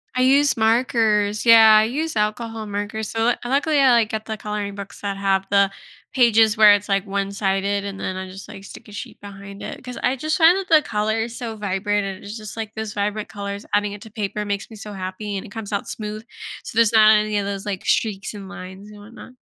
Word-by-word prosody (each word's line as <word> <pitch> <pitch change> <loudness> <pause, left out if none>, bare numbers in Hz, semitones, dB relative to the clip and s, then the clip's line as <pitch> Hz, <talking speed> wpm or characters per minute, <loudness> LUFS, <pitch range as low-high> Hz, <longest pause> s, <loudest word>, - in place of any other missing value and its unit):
I 255 - +1
use 275 +2 +4
markers 220 -2 +2
yeah, 225 -2 +8
I 215 - +5
use 300 +5 -3
alcohol 220 +1 -2
markers, 205 +1 -4
so 225 - -4
lu 245 - +4
luckily, 285 +3 +1
I, 265 -2 +5
like, 230 -2 +3
get 220 0 -4
the 220 - -4
coloring 210 -1 -4
books 200 0 -9
that 200 -1 -3
have 195 -1 +1
the 200 -1 +3 0.4
pages 225 -4 +4
where 210 -1 +8
it's, 205 +1 -1
like, 195 0 0
one-sided, 200 0 -1
and 200 -1 -6
then 185 -1 -4
I 190 - -5
just, 195 +1 -11
like, 195 - -10
stick - - -12
a - - -12
sheet 205 - -9
behind 200 0 -10
it, - - -7
'cause 250 -1 -8
I 260 +1 +1
just 310 +3 -1
find 340 +2 +6
that 390 -2 -4
the 310 -2 +6
color 220 -1 -1
is 230 +1 -5
so 230 -2 -5
vibrant, 205 0 -1
and 195 -1 -6
it's 205 +2 -7
just, 215 -1 -8
like, 220 -1 -5
those 220 -1 -5
vibrant 210 +1 -2
colors 200 -1 -6
adding 205 0 +1
it 205 - -10
to 220 - -12
paper 210 0 -3
makes 200 -1 -4
me 225 - -11
so 210 0 -9
happy, 195 +1 -5
and 190 - -6
it - - -11
comes 220 -2 -7
out 200 -1 -2
smooth, 215 0 -6 0.4
so - - -7
there's 230 -1 +5
not 215 0 +7
any 210 0 0
of 200 - -1
those, 200 0 -4
like, 195 -3 -4
streaks, 210 -2 0
and 200 -2 -9
lines, 190 +2 -10
and 210 - -13
whatnot. 230 +4 -13
210 Hz, 235 wpm, -22 LUFS, 200-225 Hz, 0.4 s, yeah